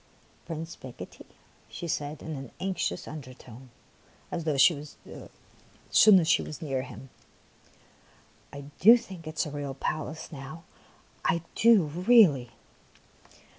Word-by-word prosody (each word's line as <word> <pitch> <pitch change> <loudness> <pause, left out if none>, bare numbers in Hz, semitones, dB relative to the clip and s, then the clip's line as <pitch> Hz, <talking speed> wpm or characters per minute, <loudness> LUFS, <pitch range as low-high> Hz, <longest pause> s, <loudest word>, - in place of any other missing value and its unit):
" - - -33
Prince 165 0 -6
Picotee," 130 -2 -11 0.4
she 170 - -7
said 150 -1 -4
in 160 -1 -5
an 135 -2 -8
anxious 190 -1 -3
undertone, 130 -4 -11 0.6
as 170 - -3 1.5
soon 210 -3 +7
as 165 - -1
she - - +4
was 155 - -7
near 135 -4 -2
him, 130 0 -11 0.7
'' - - -31
I 140 - -8 0.2
do 230 +6 +8
think 190 -8 -11
it 155 0 -8
is - - +1
a 150 - -6
real 140 -2 -5
palace 155 +2 -4
now, 150 +3 -9 0.6
I 170 -1 0
do 225 -5 +5
really 165 - +4
155 Hz, 130 wpm, -28 LUFS, 135-170 Hz, 1.5 s, do